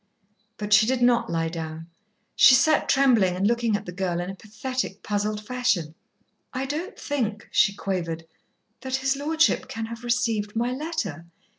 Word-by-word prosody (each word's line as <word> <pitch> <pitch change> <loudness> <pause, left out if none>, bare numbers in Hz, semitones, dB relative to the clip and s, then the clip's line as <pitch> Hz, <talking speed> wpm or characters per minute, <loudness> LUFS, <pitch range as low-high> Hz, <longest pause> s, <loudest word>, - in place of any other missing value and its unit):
But 210 0 -1
she 215 +1 +6
did 255 -1 +1
not 235 -1 +3
lie 165 -1 -1
down. 160 -1 -6 0.5
She 260 - +8
sat 300 +4 +3
trembling 235 -10 +4
and 190 +2 0
looking 235 -1 +2
at 205 0 -4
the 180 - -6
girl 180 -1 -2
in 175 +2 -3
a - - -9
pathetic, 215 +1 -5
puzzled 210 0 -2
fashion. 210 -11 0 0.6
"I 260 +1 -2
don't 320 +10 -4
think," 225 -7 -3
she 200 - +3
quavered, 170 -5 -3 0.5
"that 260 0 -3
his 265 +1 0
lordship 315 +4 +1
can 225 0 -4
have 230 +1 -8
received 230 -3 0
my 240 +2 0
letter. 255 - -4
225 Hz, 165 wpm, -25 LUFS, 195-260 Hz, 0.6 s, She